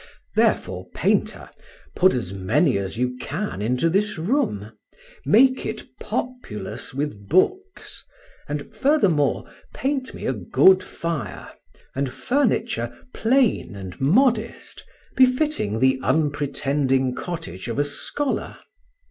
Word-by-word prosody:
Therefore, - - +1
painter, - - 0 0.4
put 185 -3 +4
as 100 -7 -3
many 120 - +2
as 95 +2 -5
you 125 +1 -1
can 170 - -4
into 125 +8 +1
this 200 +4 +1
room. 160 - -1 0.6
Make 260 - +5
it - - -4 0.2
populous 250 - -5
with 130 -8 -4
books, 385 - 0 0.5
and, 145 +8 -5
furthermore, 215 - +2 0.3
paint 265 -1 -2
me - - -7
a 130 - +1
good 135 - +4
fire, 150 - -5 0.4
and 135 -1 -2
furniture 220 - 0 0.2
plain 230 - +2
and 95 +1 -9
modest, 230 - +1 0.3
befitting 255 - +2
the 130 +1 +3
unpretending 140 -3 +1
cottage 165 - -6
of 115 - -3
a 145 - +3
scholar. 260 - -3
150 Hz, 110 wpm, -23 LUFS, -, 0.6 s, Make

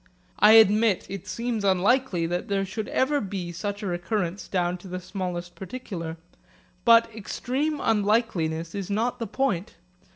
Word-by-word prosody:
I 210 +1 +8
admit 220 -2 +5
it 195 -2 -7
seems 230 -2 -2
unlikely 195 0 +2
that 175 +2 -2
there 195 -1 0
should 210 +3 -5
ever 285 +2 +1
be 190 -3 -4
such 205 +4 -4
a - - -3
recurrence 180 +1 -2
down 180 -1 -1
to 190 - -12
the 185 0 -4
smallest 180 -2 -5
particular. 175 -4 -6 0.7
But 230 -1 +6
extreme 260 +8 -2
unlikeliness 200 -8 +1
is 200 -2 -4
not 235 +5 -1
the 230 - -3
point. 225 -5 -1
200 Hz, 150 wpm, -26 LUFS, 180-230 Hz, 0.7 s, I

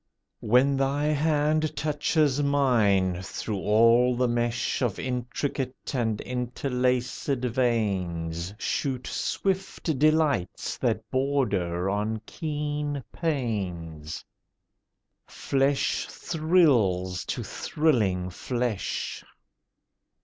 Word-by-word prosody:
When 130 +5 +3
thy 140 +2 +1
hand 155 +1 +1
touches 150 -1 +1
mine, 110 -11 +2
through 100 +2 -4
all 115 +4 +4
the 125 +1 +2
mesh 120 +1 0
Of 120 -6 0
intricate 125 +2 -3
and 115 -5 0
interlacèd 125 +1 -1
veins 95 -9 -1
Shoot 130 +1 -2
swift 190 -4 -2
delights 155 - +1
that - - 0
border 120 -10 0
on 105 +3 -1
keen 150 -2 -3
pains: 90 - -3 1.0
Flesh 135 0 0
thrills 120 - +2
to - - -3
thrilling 105 - 0
flesh. 120 +2 -3
125 Hz, 80 wpm, -27 LUFS, 105-145 Hz, 1.0 s, all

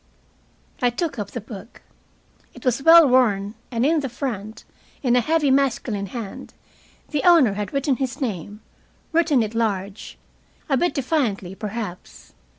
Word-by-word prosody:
I 245 - +4
took 285 +2 -3
up 205 -1 -4
the 240 - -5
book. 215 +1 -11 0.7
It - - -13
was 250 +1 +1
well 330 +1 +8
worn, 215 -6 +2 0.2
and 235 0 0
in 320 +2 +3
the 275 -2 -3
front, 225 -4 -5 0.4
in 245 -2 +3
a 250 - +4
heavy 310 +1 +2
masculine 240 -7 0
hand, 220 -1 -8 0.5
the 295 -3 -1
owner 325 - +6
had 205 -1 -4
written 275 -1 0
his 260 -3 -3
name 210 - -4 0.5
written 320 -7 +3
it 215 0 -5
large, 205 -3 -3 0.5
a 275 - +2
bit 350 +7 0
defiantly, 245 - -1
perhaps. 205 -2 -7
240 Hz, 150 wpm, -22 LUFS, 210-275 Hz, 0.7 s, well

